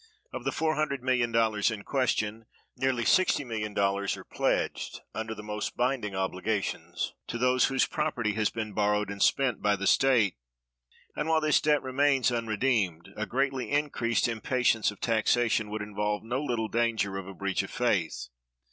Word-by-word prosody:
Of - - -6
the - - +2
[$400,000,000] 125 -9 +1
in 110 -3 -5
question, 115 -4 -1 0.3
nearly 130 -2 0
[$60,000,000] 105 - +1
are - - -10
pledged, - - -1
under 110 0 -4
the 105 - -9
most 105 0 -4
binding 120 -5 0
obligations, 95 +2 -2
to 120 - -3
those 125 +1 +3
whose 135 -1 +2
property 140 -9 -1
has 110 0 +1
been 110 -2 -5
borrowed 105 -1 +1
and 100 0 -7
spent 135 -5 +2
by 105 0 +3
the 100 0 -4
state; 115 - +3 0.8
and, 160 - -2
while 160 0 +4
this 155 -1 +3
debt 150 -2 +2
remains 130 -1 +2
unredeemed, 110 -7 0
a 110 - -3
greatly 135 0 -1
increased 140 -6 +1
impatience 115 0 +1
of 105 - -9
taxation 115 -1 +2
would 105 0 -3
involve 105 0 -2
no 120 +4 -2
little 120 -5 -1
danger 110 -4 0
of 95 - -8
a 95 - -9
breach 100 0 -1
of 100 - -7
faith. 85 - -1
115 Hz, 155 wpm, -28 LUFS, 105-130 Hz, 0.8 s, while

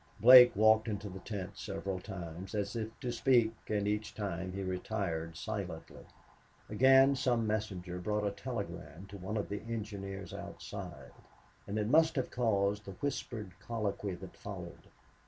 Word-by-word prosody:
Blake 125 -1 +10
walked 110 +2 +5
into 105 -1 -3
the 95 +1 -8
tent 100 -1 -6
several 95 -2 -4
times, 90 0 -7
as 100 0 -2
if 115 0 -4
to 125 - -2
speak, 120 -2 +3
and 105 -1 0
each 105 0 -2
time 95 -3 -3
he 95 +1 -4
retired 90 -4 -3
silently. 95 -6 -5 0.7
Again, 135 +5 +6
some 120 -3 +1
messenger 95 -5 -2
brought 105 +3 -1
a 100 - +1
telegram 100 - -6
to 100 - -8
one 100 +4 -3
of 105 - -2
the 105 - -4
engineers 100 -5 -5
outside, 65 -2 -8 0.6
and 100 +2 -3
it 105 - +1
must 160 +5 +5
have 130 -3 -1
caused 105 -4 +1
the 95 - -7
whispered 115 -4 -4
colloquy 105 -4 -3
that 95 +1 -10
followed. 90 -4 -8
105 Hz, 155 wpm, -33 LUFS, 95-110 Hz, 0.7 s, Blake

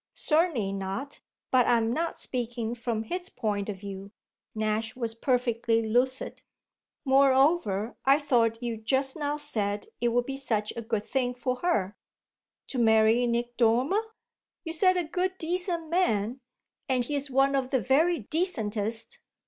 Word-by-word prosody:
"Certainly 305 - +1
not, 195 +9 -4 0.3
but 255 -2 +4
I'm 230 -1 +3
not 330 +3 -2
speaking 235 -2 -3
from 230 -2 -3
his 355 +10 -4
point 205 -2 -2
of 200 - -4
view." 195 -1 -7 0.5
Nash 215 +1 -1
was 230 -3 -3
perfectly 235 -2 +1
lucid. 250 +4 0 0.6
"Moreover, 265 - +3
I 275 +1 +5
thought 235 -5 +1
you 235 -2 -2
just 265 +5 0
now 295 -1 -2
said 210 - -2
it 240 - +2
would 240 +1 +1
be 270 +1 -4
such 220 -6 -1
a 235 - -4
good 220 -2 -2
thing 250 -1 -1
for 250 +1 -2
her." 215 - 0 0.7
"To 260 - -3
marry 225 +1 +4
Nick 240 +1 -2
Dormer?" 250 - +3 0.6
"You 325 -2 -4
said 370 +2 +3
a 355 - +1
good 365 +4 -2
decent 340 -1 -2
man, 245 - +1 0.5
and 255 -2 +2
he's 285 +1 -2
one 270 +1 +3
of 265 -2 0
the 260 - +2
very 305 +5 +2
decentest." 225 - -2
245 Hz, 150 wpm, -28 LUFS, 225-285 Hz, 0.7 s, I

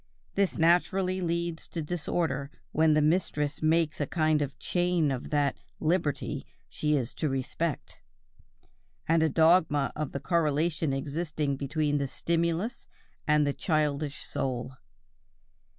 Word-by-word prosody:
This 195 -1 +1
naturally 185 +3 +2
leads 170 -1 -2
to 170 - -5
disorder 150 -3 -1 0.2
when 155 0 +4
the 155 - +3
mistress 150 -3 0
makes 160 -1 +2
a 145 - 0
kind 155 -1 +2
of 140 -1 -3
chain 175 -4 +1
of 130 -2 -4
that 145 -2 +1 0.2
"liberty" 155 -3 0 0.2
she 150 0 0
is 125 -4 -1
to 155 - -1
respect, 135 +4 -3 1.1
and 165 0 +3
a 160 - +3
dogma 160 -2 +4
of 150 -1 -3
the 140 - -3
correlation 155 0 +1
existing 145 +1 -2
between 145 +1 0
the 140 - -1
stimulus 170 - -1 0.4
and 150 -1 +4
the 145 - 0
childish 150 -3 -1
soul. 130 -3 -3
155 Hz, 130 wpm, -29 LUFS, 145-170 Hz, 1.1 s, when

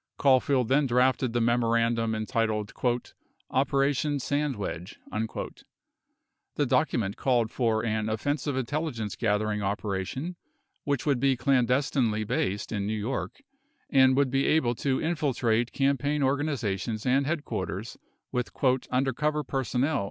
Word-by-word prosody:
Caulfield 130 -2 +3
then 135 +3 +3
drafted 125 0 +2
the 120 - 0
memorandum 115 -1 +2
entitled 110 -1 -1 0.8
"Operation 140 +2 +1
Sandwadge" 130 - -3
42 110 +1 -4 0.9
The - - +1
document 100 -4 +1
called 120 -4 +1
for 115 -3 0
an 110 -1 -1
offensive 145 +5 -1
intelligence 130 -5 -2
gathering 105 -1 0
opera 100 -1 -1
tion 150 - -5 0.5
which 140 -2 -1
would 140 -4 +2
be 135 0 +2
clandestinely 125 -3 +2
based 100 -1 -2
in 100 -2 -2
New 110 +1 -1
York 135 - -4 0.5
and 130 -1 +5
would 140 -2 +2
be 135 +1 +2
able 140 -7 +3
to 130 +2 -1
infiltrate 125 -8 0
campaign 140 +1 +1
organizations 125 -7 -1
and 135 +2 +2
headquarters 155 -2 -3 0.4
with 125 0 -1 0.4
"undercover 135 +4 0
personnel." 135 +2 0
125 Hz, 120 wpm, -27 LUFS, 110-140 Hz, 0.9 s, and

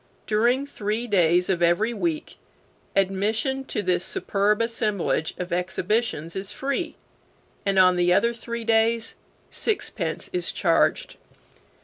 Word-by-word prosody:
During 240 +6 +2
three 220 -3 -3
days 180 -4 +3
of 180 -3 0
every 175 +7 +2
week 170 -7 -3 0.6
admission 215 +7 +1
to 210 - -3
this 180 -1 +1
superb 205 +2 0
assemblage 215 -8 0
of 180 -1 -4
exhibitions 180 -1 -1
is 195 +1 -4
free, 280 +6 -3 0.7
and 195 -1 +1
on 185 -1 +6
the 175 0 +3
other 235 +6 +3
three 235 0 -6
days 225 0 +2 0.4
sixpence 420 -3 -1
is 360 -1 -1
charged. - - +1
210 Hz, 120 wpm, -24 LUFS, 180-235 Hz, 0.7 s, on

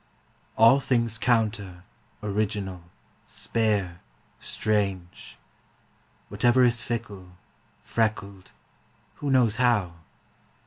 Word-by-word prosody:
All 115 +5 +6
things 115 -4 0
counter, 105 -7 -1 0.4
original, 100 -3 -3 0.4
spare, 100 -6 -1 0.4
strange; 95 -4 -3 0.9
Whatever 120 +1 +3
is 120 -1 +3
fickle, 105 -7 -6 0.5
freckled 100 -4 -3 0.7
(who 145 - -4
knows 120 -5 +3
how?) 115 -9 +1
110 Hz, 75 wpm, -25 LUFS, 95-115 Hz, 0.9 s, All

